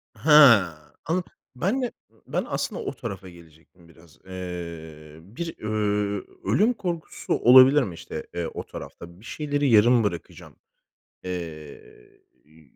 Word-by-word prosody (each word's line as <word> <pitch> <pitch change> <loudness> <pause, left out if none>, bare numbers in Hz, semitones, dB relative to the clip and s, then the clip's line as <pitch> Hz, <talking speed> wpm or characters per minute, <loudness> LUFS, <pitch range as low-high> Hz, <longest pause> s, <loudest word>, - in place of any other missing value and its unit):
Ha. 130 - +6 0.3
Anla 175 +3 -1 0.3
Ben 200 - -1
de. 245 - -2 0.4
Ben - - -2
aslında - - -3
o 410 - -4
tarafa 100 -5 -7
gelecektim 85 0 -19
biraz. 80 -1 -20
Eee, 85 -4 -8
bir, 120 - -7
ööö, 105 -2 -1 0.2
ölüm 200 - +2
korkusu 175 -7 -4
olabilir 130 +4 +7
mi 95 - -5
işte, - - -8
eee, 85 -1 -2
o - - -5
tarafta? 85 +1 -11
Bir 110 - -17
şeyleri 145 +1 -1
yarım 115 +1 +5
bırakacağım. 90 -5 -6 0.7
Eee, 90 - -5 1.1
ü 80 +1 -22
105 Hz, 125 wpm, -24 LUFS, 85-145 Hz, 1.1 s, olabilir